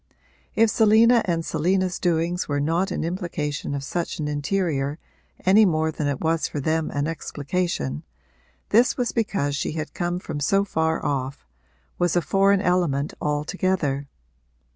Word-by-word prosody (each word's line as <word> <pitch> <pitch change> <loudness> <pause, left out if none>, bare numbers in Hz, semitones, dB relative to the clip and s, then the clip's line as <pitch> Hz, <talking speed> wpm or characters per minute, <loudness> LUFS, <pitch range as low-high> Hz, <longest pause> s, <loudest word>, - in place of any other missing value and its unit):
If 225 0 +4
Selina 225 +2 +5
and 165 -2 -1
Selina's 185 +2 0
doings 175 0 0
were 145 -1 -1
not 165 +6 +1
an - - -2
implication 160 -5 -3
of 140 - -4
such 170 +4 -3
an 150 - -3
interior 150 -1 -1 0.5
any 200 +4 +6
more 160 -4 +2
than 150 -1 -3
it 140 -2 -2
was 165 0 +1
for 145 - -4
them 160 +2 0
an 145 0 -1
explication, 155 - -3 0.7
this 235 +4 +4
was 245 -2 0
because 195 -11 -1
she 145 - -2
had 155 -1 -5
come 175 0 -2
from 155 -4 -5
so 195 +7 +2
far 160 -3 -1
off, 135 0 -2 0.5
was 175 -1 +2
a 175 - +3
foreign 195 +2 +3
element 170 -7 +1
altogether. 150 -1 -1
165 Hz, 150 wpm, -24 LUFS, 145-185 Hz, 0.7 s, any